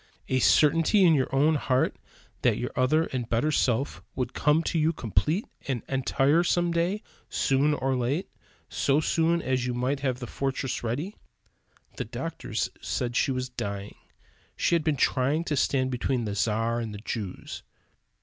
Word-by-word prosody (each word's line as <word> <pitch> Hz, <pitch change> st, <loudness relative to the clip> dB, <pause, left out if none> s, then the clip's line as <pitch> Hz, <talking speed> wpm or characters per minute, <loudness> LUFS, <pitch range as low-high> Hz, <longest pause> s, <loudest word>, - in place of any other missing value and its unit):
A 130 Hz, -, +2 dB
certainty 160 Hz, -, +4 dB
in 170 Hz, -3 st, +6 dB
your 135 Hz, -4 st, +2 dB
own 145 Hz, +4 st, +3 dB
heart 130 Hz, -3 st, +1 dB, 0.5 s
that -, -, +3 dB
your -, -, -3 dB
other 150 Hz, +5 st, +3 dB
and 125 Hz, -3 st, -3 dB
better 120 Hz, +7 st, +1 dB
self 130 Hz, -1 st, 0 dB
would 125 Hz, -2 st, -2 dB
come 150 Hz, +2 st, +2 dB
to 165 Hz, -, 0 dB
you 155 Hz, +1 st, +3 dB
complete 150 Hz, -, 0 dB, 0.2 s
and 130 Hz, -4 st, -2 dB
entire 135 Hz, +4 st, +2 dB
some 175 Hz, 0 st, +1 dB
day, 175 Hz, +5 st, 0 dB, 0.3 s
soon 140 Hz, +3 st, +2 dB
or 135 Hz, -1 st, 0 dB
late, 130 Hz, +9 st, -1 dB, 0.4 s
so 140 Hz, +2 st, +1 dB
soon 165 Hz, +2 st, +1 dB
as 130 Hz, -1 st, 0 dB
you 125 Hz, -, -2 dB
might 130 Hz, +3 st, 0 dB
have 130 Hz, -3 st, -1 dB
the 125 Hz, -, -6 dB
fortress 135 Hz, 0 st, -3 dB
ready? 145 Hz, -, -3 dB, 0.8 s
The -, -, -3 dB
doctors -, -, -4 dB
said 120 Hz, -1 st, -2 dB
she -, -, +2 dB
was 130 Hz, -1 st, -2 dB
dying. 100 Hz, -4 st, -5 dB, 0.6 s
She -, -, +1 dB
had 170 Hz, -2 st, +3 dB
been 155 Hz, -2 st, +1 dB
trying 135 Hz, +6 st, +2 dB
to 155 Hz, -, -1 dB
stand 130 Hz, -1 st, +1 dB
between 125 Hz, -1 st, -1 dB
the 105 Hz, -, -3 dB
Czar 115 Hz, +3 st, 0 dB
and 110 Hz, -3 st, -4 dB
the 105 Hz, -, -10 dB
Jews. 105 Hz, -6 st, -5 dB
135 Hz, 170 wpm, -27 LUFS, 125-155 Hz, 0.8 s, in